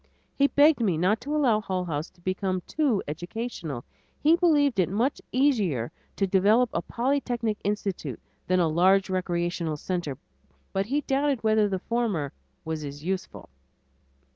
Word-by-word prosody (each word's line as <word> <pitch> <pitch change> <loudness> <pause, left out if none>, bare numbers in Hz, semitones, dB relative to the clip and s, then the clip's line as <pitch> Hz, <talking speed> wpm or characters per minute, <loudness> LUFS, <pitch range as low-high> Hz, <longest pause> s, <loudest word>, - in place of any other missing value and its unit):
He 280 - +3
begged 290 +1 +5
me 190 -8 +2
not 190 +7 +2
to 290 +5 -3
allow 245 -8 +3
Hull 185 -3 -2
House 155 -2 -3
to 180 - -27
become 185 0 -1
too 280 -10 +1
educational. 170 - -5 0.3
He 315 +3 +5
believed 295 - +3
it 180 - +3
much 230 +8 0
easier 210 - +1 0.2
to 195 - +1
develop 205 +6 +3
a 170 - 0
polytechnic 240 -2 -1
institute 195 - -2 0.3
than 185 0 +3
a 170 - +3
large 185 +4 +3
recreational 175 -3 -1
center, 170 -5 -3 0.6
but 195 +1 0
he 285 +5 0
doubted 275 -3 0
whether 215 -1 +3
the 190 - -1
former 205 -9 -1 0.3
was 160 -1 -3
as 145 0 -7
useful. 190 +2 -4
195 Hz, 150 wpm, -26 LUFS, 175-245 Hz, 0.6 s, begged